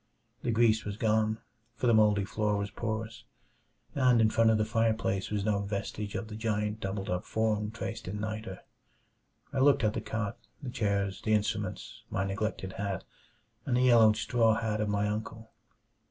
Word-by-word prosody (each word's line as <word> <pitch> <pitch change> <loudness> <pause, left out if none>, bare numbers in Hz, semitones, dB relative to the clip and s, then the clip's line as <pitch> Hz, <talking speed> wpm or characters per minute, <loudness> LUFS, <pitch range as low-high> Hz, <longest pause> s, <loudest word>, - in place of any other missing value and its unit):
The - - -2
grease 110 -1 +3
was 100 0 -5
gone, 110 0 +2 0.4
for - - -3
the 120 - +5
moldy 105 -2 +4
floor 105 0 0
was 100 0 -3
porous. 110 0 -4 0.7
And 125 -4 +4
in 110 -1 +4
front 115 0 +4
of 110 - +4
the 110 - +1
fireplace 110 -4 0
was 105 -1 -1
no 105 -2 +2
vestige 100 +1 -4
of 110 - -3
the 110 - -8
giant 105 -1 -1
doubled 95 0 -3
up 90 0 -1
form 110 -1 0
traced 115 0 -6
in 100 +3 -4
niter. 110 -3 -5 0.9
I 135 - 0
looked 140 0 +4
at 105 -1 +2
the - - -3
cot, 110 -2 -3 0.2
the 125 - -4
chairs, 100 -4 -1
the 110 - +1
instruments, 105 0 -3
my 95 - -1
neglected 95 -1 -3
hat, 100 -2 -3 0.6
and 125 -2 +2
the - - +3
yellowed 115 -4 +6
straw 115 0 +3
hat 110 -1 -1
of 105 - 0
my 105 0 +1
uncle. 110 +1 -5
110 Hz, 180 wpm, -30 LUFS, 105-110 Hz, 0.9 s, yellowed